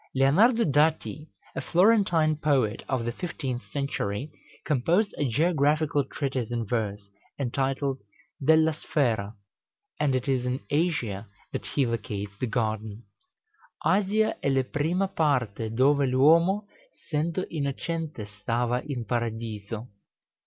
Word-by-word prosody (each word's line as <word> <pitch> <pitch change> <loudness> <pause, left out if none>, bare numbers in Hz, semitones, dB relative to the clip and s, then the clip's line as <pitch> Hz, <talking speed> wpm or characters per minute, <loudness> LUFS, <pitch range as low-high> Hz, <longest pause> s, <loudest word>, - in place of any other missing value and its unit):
Leonardo 200 - +5
Dati, 150 +1 +1 0.3
a - - -2
Florentine 175 -5 +3
poet 135 -8 +1
of 130 -4 0
the 120 - -1
fifteenth 130 -4 -4
century, 140 -2 -2 0.3
composed 170 - +2
a 145 -3 +1
geographical 150 +1 +2
treatise 130 -4 -3
in 120 -1 -1
verse, 105 -2 -2 0.3
entitled 135 +1 -1 0.4
"Della 160 +2 +5
Sfera;" 115 -9 -1 0.6
and 140 -3 +2
it 130 - -2
is 130 -2 +1
in 125 +1 -1
Asia 125 - 0 0.2
that - - -4
he 140 - +1
locates 105 -3 -4
the 130 - -1
garden: 110 -1 -2 0.8
"Asia 210 +3 +2
e - - +2
le 135 -1 +2
prima 165 +9 0
parte 125 - 0
dove 135 +4 +3
l'huomo 165 +10 +4 0.5
Sendo 160 +4 0
innocente 155 -3 -3
stava 120 +5 -1
in 135 -6 -4
Paradiso." 115 -2 -3
135 Hz, 115 wpm, -27 LUFS, 115-155 Hz, 0.8 s, Leonardo